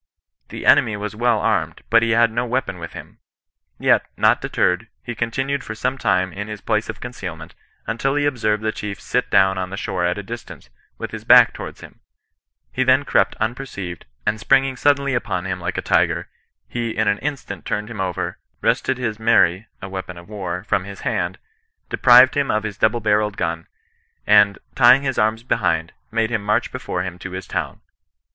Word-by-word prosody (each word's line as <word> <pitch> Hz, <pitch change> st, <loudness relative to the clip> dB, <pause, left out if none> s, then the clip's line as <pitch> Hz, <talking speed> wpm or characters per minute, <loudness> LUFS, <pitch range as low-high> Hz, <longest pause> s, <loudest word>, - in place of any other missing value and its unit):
The -, -, -7 dB
enemy 110 Hz, -2 st, +5 dB
was 105 Hz, +1 st, -5 dB
well 120 Hz, 0 st, +2 dB
armed, -, -, -1 dB
but 115 Hz, 0 st, +6 dB
he 115 Hz, -, +1 dB
had 115 Hz, 0 st, +4 dB
no 120 Hz, +2 st, -1 dB
weapon 125 Hz, -6 st, -2 dB
with 85 Hz, -, -8 dB
him; -, -, -11 dB, 0.6 s
yet, -, -, +3 dB
not -, -, +3 dB
deterred, 90 Hz, +5 st, 0 dB, 0.2 s
he 120 Hz, -, -5 dB
continued 130 Hz, +5 st, -2 dB
for 110 Hz, -, -6 dB
some 130 Hz, +4 st, -1 dB
time 95 Hz, -7 st, 0 dB
in 105 Hz, +1 st, -5 dB
his 105 Hz, -1 st, -6 dB
place 110 Hz, +2 st, -1 dB
of -, -, -6 dB
concealment, 90 Hz, -10 st, -7 dB, 0.3 s
until 125 Hz, +5 st, -1 dB
he 145 Hz, 0 st, +1 dB
observed 110 Hz, -6 st, 0 dB
the 110 Hz, -, +1 dB
chief 105 Hz, -2 st, -6 dB
sit -, -, -1 dB
down 95 Hz, -1 st, +4 dB
on 90 Hz, 0 st, -3 dB
the 100 Hz, -, -6 dB
shore 95 Hz, -2 st, -2 dB
at 90 Hz, +2 st, 0 dB
a 100 Hz, -, -5 dB
distance, 115 Hz, -, -9 dB, 0.3 s
with -, -, -6 dB
his -, -, -7 dB
back -, -, +7 dB
towards -, -, -8 dB
him: -, -, -13 dB, 0.7 s
he 130 Hz, -, 0 dB
then 130 Hz, +2 st, +3 dB
crept 95 Hz, -, +2 dB
unperceived, 110 Hz, -7 st, -5 dB, 0.2 s
and 105 Hz, 0 st, 0 dB
springing 135 Hz, +2 st, +2 dB
suddenly 140 Hz, +1 st, +2 dB
upon 90 Hz, -7 st, -2 dB
him 90 Hz, -1 st, -3 dB
like 85 Hz, +1 st, -4 dB
a -, -, -2 dB
tiger, -, -, +1 dB, 0.4 s
he 120 Hz, -1 st, -3 dB
in 110 Hz, -1 st, +1 dB
a 100 Hz, 0 st, +2 dB
instant 130 Hz, -9 st, -5 dB
turned 105 Hz, 0 st, -3 dB
him 110 Hz, -3 st, -5 dB
over, 90 Hz, -2 st, -3 dB, 0.2 s
wrested 120 Hz, +3 st, +1 dB
his 110 Hz, -4 st, -3 dB
mery 110 Hz, -3 st, +3 dB, 0.2 s
(a -, -, -4 dB
weapon 95 Hz, -2 st, -6 dB
of 85 Hz, -, -12 dB
war) 95 Hz, -4 st, -5 dB
from 100 Hz, -2 st, 0 dB
his 100 Hz, 0 st, -9 dB
hand, 90 Hz, +1 st, -2 dB, 0.5 s
deprived 125 Hz, +1 st, +6 dB
him 145 Hz, -1 st, +1 dB
of 105 Hz, 0 st, +1 dB
his 105 Hz, -2 st, -4 dB
double 115 Hz, +3 st, +1 dB
barrelled 105 Hz, -1 st, +1 dB
gun, 80 Hz, 0 st, -3 dB, 0.6 s
and 105 Hz, -1 st, +5 dB, 0.2 s
tying 130 Hz, +2 st, +6 dB
his 130 Hz, -2 st, -1 dB
arms 110 Hz, +2 st, +1 dB
behind, 80 Hz, -8 st, 0 dB, 0.2 s
made 115 Hz, 0 st, 0 dB
him 110 Hz, -3 st, -1 dB
march 105 Hz, +3 st, 0 dB
before -, -, -3 dB
nim 90 Hz, -1 st, -6 dB
to 90 Hz, 0 st, -7 dB
his 95 Hz, 0 st, -5 dB
town. -, -, -4 dB
110 Hz, 195 wpm, -21 LUFS, 95-120 Hz, 0.7 s, back